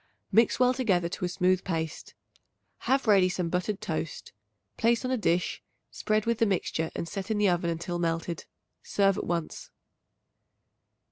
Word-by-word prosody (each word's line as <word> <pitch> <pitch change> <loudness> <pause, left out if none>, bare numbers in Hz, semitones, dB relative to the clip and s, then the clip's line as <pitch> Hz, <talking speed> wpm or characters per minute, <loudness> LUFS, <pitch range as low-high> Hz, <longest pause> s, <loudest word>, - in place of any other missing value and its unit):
Mix 230 +1 +4
well 250 0 +5
together 195 -9 +1
to 180 - -3
a - - -2
smooth 180 +1 +1
paste. 160 -3 -4 0.7
Have 270 +1 +3
ready 195 -4 +5
some 180 -2 -2
buttered 180 +4 -1
toast; 160 -2 -4 0.4
place 235 +2 +2
on 255 - -1
a - - +2
dish, 175 -5 0 0.3
spread 215 0 0
with 235 0 0
the 225 - +4
mixture 165 -4 -1
and 170 - -3
set 195 +4 -5
in 220 - 0
the 205 -1 +3
oven 175 -1 +1
until 170 +1 -3
melted. 165 0 -2 0.4
Serve 195 0 +2
at - - -4
once. 170 -2 -3
185 Hz, 160 wpm, -28 LUFS, 170-215 Hz, 0.7 s, well